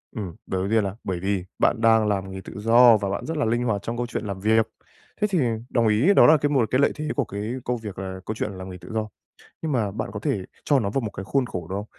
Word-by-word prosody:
Ừm, 95 Hz, -7 st, -5 dB
đầu 95 Hz, -, -1 dB
đầu 95 Hz, -, -2 dB
tiên 110 Hz, 0 st, +3 dB
là 95 Hz, -1 st, -3 dB
bởi 90 Hz, -2 st, -3 dB
vì 95 Hz, 0 st, -1 dB
bạn 115 Hz, -, +2 dB
đang 110 Hz, -1 st, +4 dB
làm 95 Hz, -2 st, -1 dB
nghề 95 Hz, -, -6 dB
tự -, -, -10 dB
do 115 Hz, +2 st, +7 dB
và 100 Hz, -2 st, -3 dB
bạn 95 Hz, -, -3 dB
rất 160 Hz, -1 st, -3 dB
là 150 Hz, -, +1 dB
linh 120 Hz, +2 st, +1 dB
hoạt 105 Hz, -5 st, 0 dB
trong 115 Hz, +3 st, -4 dB
câu 120 Hz, -, -1 dB
chuyện 115 Hz, -, -4 dB
làm 100 Hz, -2 st, -4 dB
việc. 110 Hz, +2 st, +3 dB, 0.5 s
Thế 210 Hz, -, +4 dB
thì 190 Hz, -4 st, 0 dB, 0.3 s
đồng 115 Hz, -2 st, +2 dB
ý 115 Hz, -, +4 dB
đó -, -, +7 dB
là 155 Hz, 0 st, +7 dB
cái 145 Hz, +1 st, 0 dB
một 135 Hz, -5 st, +3 dB
cái 130 Hz, -, +3 dB
lợi -, -, +4 dB
thế 155 Hz, 0 st, -4 dB
của 140 Hz, -, +1 dB
cái 105 Hz, +4 st, -4 dB
công 125 Hz, 0 st, 0 dB
việc 105 Hz, -4 st, -7 dB
là 95 Hz, -1 st, -5 dB
câu 110 Hz, -, -3 dB
chuyện 105 Hz, -, -3 dB
làm 95 Hz, -1 st, -8 dB
nghề 90 Hz, -, -8 dB
tự 90 Hz, -, -12 dB
do, 110 Hz, -1 st, -1 dB, 0.6 s
nhưng 155 Hz, -, -1 dB
mà 110 Hz, -6 st, +1 dB
bạn 110 Hz, +1 st, -4 dB
có 105 Hz, -, -5 dB
thể 105 Hz, -6 st, -1 dB, 0.2 s
cho 145 Hz, -, +3 dB
nó 100 Hz, -, -1 dB
vào 135 Hz, -, 0 dB
một 110 Hz, -4 st, -4 dB
cái 95 Hz, -1 st, -7 dB
khuôn 135 Hz, +5 st, 0 dB
khổ 90 Hz, -7 st, -5 dB
được 95 Hz, -, -3 dB
không? 100 Hz, -, -3 dB
110 Hz, 300 wpm, -24 LUFS, 95-120 Hz, 0.6 s, do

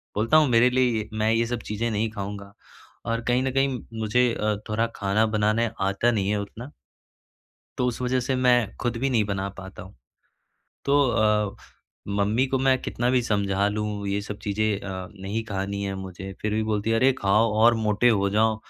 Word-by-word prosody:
बोलता 115 Hz, +9 st, +3 dB
हूँ 155 Hz, -1 st, +5 dB
मेरे 120 Hz, +1 st, +5 dB
लिए 125 Hz, -4 st, +1 dB
मैं 110 Hz, 0 st, +1 dB
ये 115 Hz, +1 st, +2 dB
सब 120 Hz, 0 st, -3 dB
चीज़ें 115 Hz, +2 st, -2 dB
नहीं 110 Hz, +1 st, 0 dB
खाऊँगा 100 Hz, -1 st, -6 dB, 0.5 s
और 115 Hz, 0 st, -1 dB
कहीं 125 Hz, +1 st, +2 dB
न 130 Hz, -, -1 dB
कहीं 135 Hz, -1 st, +1 dB, 0.2 s
मुझे 125 Hz, +3 st, +2 dB
अ, 105 Hz, -1 st, 0 dB
थोड़ा 115 Hz, +2 st, +1 dB
खाना 100 Hz, +2 st, +1 dB
बनाने 110 Hz, +1 st, +1 dB
आता 100 Hz, +5 st, +2 dB
नहीं 100 Hz, -4 st, 0 dB
है 105 Hz, -, +1 dB
उतना 120 Hz, +7 st, -9 dB, 1.1 s
तो 125 Hz, -, +1 dB
उस 125 Hz, -1 st, -2 dB
वजह 125 Hz, +1 st, +1 dB
से 130 Hz, +2 st, -1 dB
मैं 125 Hz, -1 st, +4 dB, 0.2 s
ख़ुद 120 Hz, -1 st, -1 dB
भी 135 Hz, +4 st, 0 dB
नहीं 110 Hz, -4 st, +2 dB
बना 100 Hz, -1 st, -2 dB
पाता 95 Hz, -1 st, -9 dB
हूँ। 95 Hz, +2 st, -13 dB, 0.9 s
तो 140 Hz, +1 st, +3 dB
अ, 105 Hz, -3 st, +1 dB, 0.5 s
मम्मी 100 Hz, +5 st, +1 dB
को 135 Hz, -, 0 dB
मैं 130 Hz, 0 st, +3 dB
कितना 120 Hz, +1 st, -1 dB
भी 125 Hz, 0 st, +3 dB
समझा 100 Hz, -3 st, 0 dB
लूँ 105 Hz, -1 st, -3 dB
ये 100 Hz, +1 st, -1 dB
सब 105 Hz, 0 st, -7 dB
चीज़ें 105 Hz, +1 st, 0 dB
अ, 95 Hz, -2 st, -6 dB
नहीं 105 Hz, +4 st, -3 dB
खानी 100 Hz, -1 st, -3 dB
है 100 Hz, -, -2 dB
मुझे 95 Hz, 0 st, -7 dB
फिर 105 Hz, 0 st, -1 dB
भी 110 Hz, 0 st, 0 dB
बोलती 110 Hz, 0 st, -1 dB
है, 115 Hz, -, +3 dB
"अरे 130 Hz, +4 st, +4 dB
खाओ, 105 Hz, +3 st, +3 dB
और 115 Hz, +2 st, +5 dB
मोटे 105 Hz, +3 st, +3 dB
हो 100 Hz, -3 st, +2 dB
जाओ, 110 Hz, +2 st, +2 dB
110 Hz, 195 wpm, -25 LUFS, 100-120 Hz, 1.1 s, हूँ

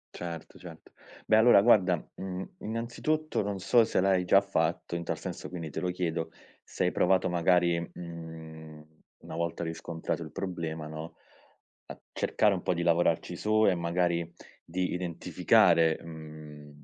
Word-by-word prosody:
Certo, 85 Hz, -2 st, -7 dB
certo, 85 Hz, -3 st, -13 dB, 0.3 s
beh, -, -, +5 dB
allora, 110 Hz, -2 st, +7 dB
guarda, 100 Hz, -5 st, +5 dB, 0.2 s
mhmm, 95 Hz, 0 st, -6 dB
innanzitutto, 120 Hz, +7 st, -2 dB
non 100 Hz, -1 st, -3 dB
so 115 Hz, +5 st, +4 dB
se 110 Hz, -4 st, +1 dB
l’hai 95 Hz, -1 st, +2 dB
già 95 Hz, +2 st, +6 dB
fatto, 85 Hz, -3 st, -1 dB
in 85 Hz, -, -3 dB
tal -, -, -3 dB
senso, -, -, -6 dB
quindi 85 Hz, -3 st, -6 dB
te -, -, -5 dB
lo 90 Hz, -, -1 dB
chiedo, 85 Hz, -2 st, -2 dB, 0.3 s
se -, -, -2 dB
hai -, -, +2 dB
provato, 95 Hz, 0 st, +2 dB
magari, 85 Hz, 0 st, +3 dB
mhmm, 80 Hz, -2 st, -9 dB, 0.4 s
una -, -, -9 dB
volta 85 Hz, +1 st, -2 dB
riscontrato 80 Hz, 0 st, -4 dB
il 80 Hz, -, -10 dB
problema, 85 Hz, -4 st, -4 dB
no, 80 Hz, +1 st, -8 dB, 0.7 s
a -, -, -9 dB
cercare 105 Hz, -2 st, +2 dB
un 95 Hz, -, -3 dB
po’ 90 Hz, -, 0 dB
di 85 Hz, -, -1 dB
lavorarci 85 Hz, 0 st, +1 dB
su 110 Hz, +4 st, +2 dB
e 95 Hz, -, +5 dB
magari 85 Hz, -1 st, 0 dB, 0.3 s
di 90 Hz, +2 st, -2 dB
identificare, 85 Hz, -1 st, +3 dB
mhmm, 75 Hz, -2 st, -11 dB
85 Hz, 155 wpm, -29 LUFS, 80-95 Hz, 0.7 s, allora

